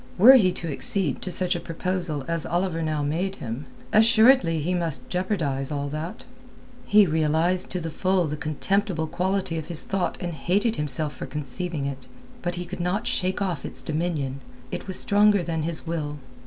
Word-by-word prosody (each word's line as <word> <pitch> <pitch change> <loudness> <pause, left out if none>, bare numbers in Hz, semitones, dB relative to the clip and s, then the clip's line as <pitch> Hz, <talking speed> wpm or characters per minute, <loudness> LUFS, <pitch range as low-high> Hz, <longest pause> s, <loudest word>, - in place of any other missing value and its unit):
Were 230 +8 +9
he 200 -9 +5
to 170 - -5
accede 160 +1 +5
to - - -4
such 185 +1 0
a - - -2
proposal 170 -4 -3
as 165 -1 +2
Oliver 175 -1 -1
now 155 -2 -1
made 175 +7 -2
him, 120 0 -6 0.3
assuredly 220 -5 +5
he 170 +5 -1
must 170 -5 -2
jeopardize 165 -8 -1
all 145 -1 -3
that. 155 +4 -6 0.6
He 210 0 +6
realized 160 +3 +1
to 180 - -3
the 165 -1 -5
full 185 +1 +1
the 150 -1 -3
contemptible 160 +3 -1
quality 185 0 -2
of 155 - -8
his 170 -2 +2
thought 195 -2 -2
and 175 -1 -4
hated 200 - 0
himself 150 0 -1
for - - -7
conceiving 150 +1 0
it. 135 -2 -6 0.3
But 175 0 -2
he 175 0 -5
could 185 +1 -8
not 180 +6 -1
shake 190 -1 0
off 175 -8 -3
its - - -1
dominion. 150 -4 -2 0.3
It - - -6
was 190 - +2
stronger 205 -2 +3
than 165 -2 -2
his 160 +1 -4
will. 155 -3 -4
170 Hz, 180 wpm, -24 LUFS, 155-190 Hz, 0.6 s, Were